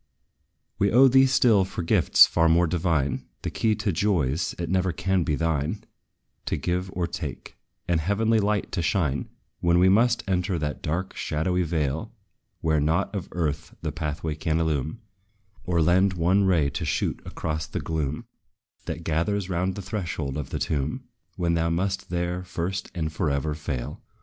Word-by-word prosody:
We 100 - +3
owe 130 +4 +7
thee 135 +1 +6
still 120 -6 +4
for 90 -1 -5
gifts 80 - +6
far 80 -1 +2
more 85 +2 +4
divine 80 -5 0 0.2
The - - -2
key 110 -1 +1
to 105 -1 -1
joys 80 -5 0
it 85 - -3
never 95 +1 +1
can 90 +2 0
be 75 - 0
thine 80 +4 -1 0.6
To - - 0
give 90 +1 -2
or 90 -1 -1
take; 85 - -6 0.3
and 85 -2 +2
heavenly 110 +6 +2
light 105 0 0
to 90 - -1
shine 80 -5 0 0.3
When 85 0 +3
we 90 +1 +5
must 115 +4 +3
enter 90 -1 0
that 75 -2 -3
dark, 90 +5 -3
shadowy 85 +4 0
vale, 80 - -2 0.5
Where 80 -1 +2
nought 80 +7 +1
of 100 -4 -4
earth 80 -2 -2
the 80 - -1
pathway 75 0 -3
can 80 +1 -1
illume, 80 - -1 0.6
Or 85 -3 +2
lend 95 +4 +3
one 90 +3 +2
ray 80 -7 +2
to - - -4
shoot - - -1
across 80 -1 -4
the - - -4
gloom, 75 -2 -3 0.6
That 80 - -4
gathers 90 +5 -1
round 90 +2 0
the 100 - -6
threshold 85 - -3
of 75 -3 -4
the - - -3
tomb, 75 0 -2 0.3
When 85 -1 0
thou 85 0 +1
must 95 +3 -1
there, 90 +1 -2
first 90 +2 -3
and 80 -2 -2
forever, 75 -2 0
fail. 70 -5 -5
85 Hz, 170 wpm, -25 LUFS, 80-95 Hz, 0.6 s, owe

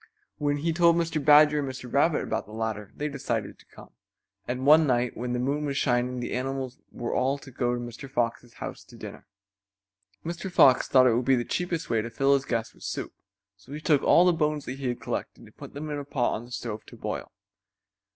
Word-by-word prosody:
When 145 0 +1
he 160 +3 -1
told 170 0 +5
Mr. 165 -3 -1
Badger 150 +1 +6
and 140 -2 -2
Mr. 130 -2 -8
Rabbit - - +3
about - - -3
the 105 - -12
ladder 110 -2 -4
they 150 - -2
decided 120 -7 -3
to - - -21
come, - - -15 0.6
and 125 +2 -3
one 155 +2 +7
night 125 -1 +1
when 125 +1 -3
the - - 0
moon 140 +4 -1
was 140 -1 -2
shining 125 -1 +1
the 120 - -4
animals 130 0 -3
were 120 - -4
all 135 +2 +1
to 140 -1 -13
go 120 -1 0
to - - -4
Mr. 120 +3 -8
Fox's 120 -1 -2
house - - -7
to - - -16
dinner. - - -10 1.0
Mr. 170 +3 -4
Fox 130 -7 +5
thought 130 -1 +5
it 125 - +5
would 120 +2 0
be 135 - +4
the 120 -1 -1
cheapest 175 -2 -2
way 115 - +2
to 115 - -5
fill 135 +4 +2
his 140 0 +1
guests 115 -1 -2
with - - -22
soup, - - -5 0.4
so 105 +8 -14
he 150 - -5
took 155 -2 +3
all 175 - +5
the 180 - +5
bones 150 -2 -1
that 130 +2 -6
he 135 - -3
had 120 -1 -2
collected - - -5
and - - -17
put - - -11
them 150 +1 -5
in 145 - -2
a - - -5
pot 135 -3 0
on 115 - -5
the 120 - -16
stove 115 -3 -5
to - - -12
boil. - - -5
130 Hz, 235 wpm, -27 LUFS, 120-150 Hz, 1.0 s, one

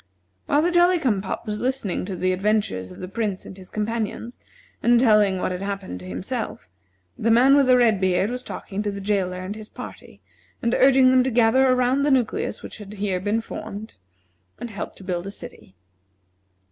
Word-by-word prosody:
While 290 +2 +3
the 350 - +2
Jolly 350 +1 +4
cum 240 - 0
pop 195 - -5
was 210 -1 -3
listening 250 -9 -2
to 190 - -4
the 185 +1 0
adventures 185 - -1
of 90 - -11
the 185 - -5
Prince 200 -1 -3
and - - -9
his 185 -1 -13
companions, 225 +2 -3 0.4
and 240 0 +4
telling 210 -5 +4
what 185 - -1
had 180 0 -4
happened 195 - -4
to 90 - -10
himself, 90 0 -5 0.5
the 230 - +1
man 250 +5 +6
with 280 -2 +4
the 255 -1 +6
red 225 -5 +3
beard 190 +3 +1
was 250 0 -3
talking 205 -5 -6
to 210 - -2
the 200 0 -5
jailer 195 -2 -1
and 195 +3 -5
his 215 -1 -10
party, - - -10 0.4
and 235 0 0
urging 260 -1 +5
them 255 -1 +5
to 265 - 0
gather 240 +2 +4
around 255 +1 +2
the 290 - +2
nucleus 265 - 0
which - - -9
had 205 -2 -10
been 210 -1 -10
here 205 +2 0
formed, 215 0 -7 0.6
and 240 - -7
help 205 - -6
to - - -13
build 180 0 -3
a - - -5
city. 95 - -12
210 Hz, 200 wpm, -23 LUFS, 190-250 Hz, 0.6 s, man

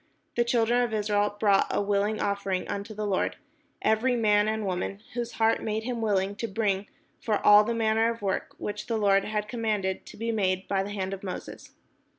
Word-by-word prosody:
The 240 - +3
children 235 0 +2
of 235 -3 0
Israel 205 -1 0
brought 200 -2 +4
a - - 0
willing 205 +1 0
offering 200 -2 -1
unto 205 +2 -5
the 210 0 -3
Lord, 195 -2 0 0.5
every 235 +4 +2
man 210 -2 +3
and 220 -1 -1
woman, 195 +2 -3
whose 240 0 -3
heart 225 0 +2
made 220 +1 -2
them 240 -2 -2
willing 200 -2 +1
to 230 - -2
bring 200 -2 -1 0.3
for 215 -2 0
all 210 0 +8
manner 225 0 +2
of 230 -2 -8
work, 195 -1 -2
which 210 +1 -5
the 230 -2 0
Lord 200 -2 +3
had 210 -1 -2
commanded 210 -4 -2
to - - -11
be 230 +2 -2
made 190 -3 0
by 195 -1 +1
the 195 - -4
hand 195 -2 -3
of 195 - -6
Moses. 185 -2 -8
210 Hz, 195 wpm, -27 LUFS, 200-225 Hz, 0.5 s, all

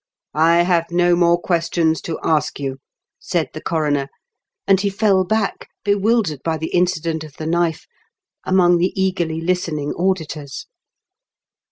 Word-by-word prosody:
I 165 +3 +4
have 170 -2 +1
no 175 0 +3
more 175 0 +3
questions 170 -2 0
to 160 - -2
ask 155 -2 0
you," 135 -1 -4 0.4
said 170 -4 -1
the 155 - -7
coroner, 150 -4 0 0.6
and 195 -1 +4
he 200 - +1
fell 200 -1 +2
back, 215 +2 -2 0.2
bewildered 205 - +1
by 165 -1 -1
the 160 +1 -5
incident 165 -3 0
of 155 -2 -12
the 155 - -5
knife, 170 -1 0 0.6
among 175 -2 +3
the 185 +2 0
eagerly 175 -4 0
listening 165 -4 -1
auditors. 160 -6 -3
170 Hz, 140 wpm, -20 LUFS, 160-185 Hz, 0.6 s, I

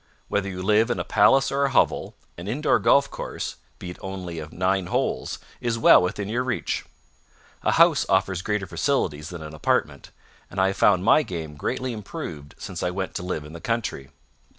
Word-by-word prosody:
Whether 100 -1 0
you 90 -1 -5
live 110 +4 +3
in 120 - -1
a - - -1
palace 135 0 +4
or 140 +1 +1
a - - +1
hovel, 130 - +1 0.2
an 85 +2 -8
indoor 135 +9 +2
golf 140 0 +4
course, - - -5 0.2
be 90 - -7
it - - -12
only 90 -3 -5
of 80 +1 -8
nine 95 +1 0
holes, - - -1 0.2
is 115 -1 -1
well 115 - +7
within 95 +2 -2
your 120 +4 -1
reach. 130 - -2 0.8
A - - +1
house - - +5
offers 95 -2 +2
greater 105 0 -1
facilities 85 - -1
than 85 -3 -7
an 75 0 -8
apartment, 70 -2 -1 0.4
and 95 - -5
I 95 0 +4
have 95 - -4
found 90 -3 +4
my 115 - +6
game 80 - -6
greatly 125 - -3
improved 100 - -7
since - - -6
I 90 - 0
went 95 +1 -4
to - - -4
live 90 -4 -4
in 75 - -11
the 85 - -9
country. 115 -12 -2
95 Hz, 195 wpm, -24 LUFS, 85-115 Hz, 0.8 s, well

